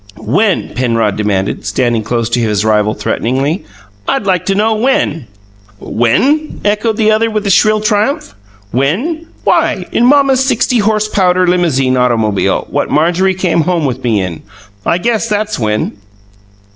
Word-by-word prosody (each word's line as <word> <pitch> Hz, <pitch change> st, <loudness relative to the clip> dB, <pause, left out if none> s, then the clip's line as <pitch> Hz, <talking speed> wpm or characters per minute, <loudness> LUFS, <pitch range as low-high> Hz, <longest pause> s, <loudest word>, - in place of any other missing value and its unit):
"When?" 190 Hz, -, 0 dB
Penrod 115 Hz, -4 st, 0 dB
demanded, 100 Hz, -2 st, -1 dB
stepping 115 Hz, +3 st, 0 dB
close 115 Hz, +1 st, -2 dB
to 120 Hz, +1 st, 0 dB
his 105 Hz, -2 st, 0 dB
rival 105 Hz, 0 st, +1 dB
threateningly. 135 Hz, -, -2 dB, 0.4 s
"I'd -, -, 0 dB
like 185 Hz, -3 st, 0 dB
to 195 Hz, -, +1 dB
know 220 Hz, +2 st, +2 dB
when 215 Hz, -, 0 dB, 0.3 s
" 100 Hz, 0 st, -30 dB
"When?" 275 Hz, -, 0 dB
echoed 210 Hz, +1 st, 0 dB
the 215 Hz, -1 st, +3 dB
other 225 Hz, +1 st, +2 dB
with 215 Hz, -2 st, -2 dB
shrill 215 Hz, +2 st, +3 dB
triumph. 215 Hz, +8 st, 0 dB, 0.4 s
"When? 235 Hz, -, -1 dB, 0.2 s
Why, -, -, +1 dB
in 240 Hz, -, +2 dB
mamma's 275 Hz, -1 st, +4 dB
sixty 255 Hz, -2 st, +1 dB
horse 215 Hz, 0 st, +1 dB
powder 185 Hz, -3 st, +2 dB
limousine 150 Hz, -8 st, +1 dB
automobile, 115 Hz, -5 st, +1 dB
what -, -, -1 dB
Marjorie 175 Hz, +5 st, +1 dB
came 180 Hz, -2 st, +1 dB
home 170 Hz, -2 st, 0 dB
with 130 Hz, -1 st, -3 dB
me 110 Hz, -5 st, +1 dB
in! 90 Hz, -3 st, -6 dB, 0.5 s
I 170 Hz, -, +2 dB
guess 230 Hz, +4 st, -1 dB
that's 210 Hz, -3 st, -1 dB
when!" 105 Hz, -2 st, -1 dB
175 Hz, 150 wpm, -13 LUFS, -, 0.5 s, mamma's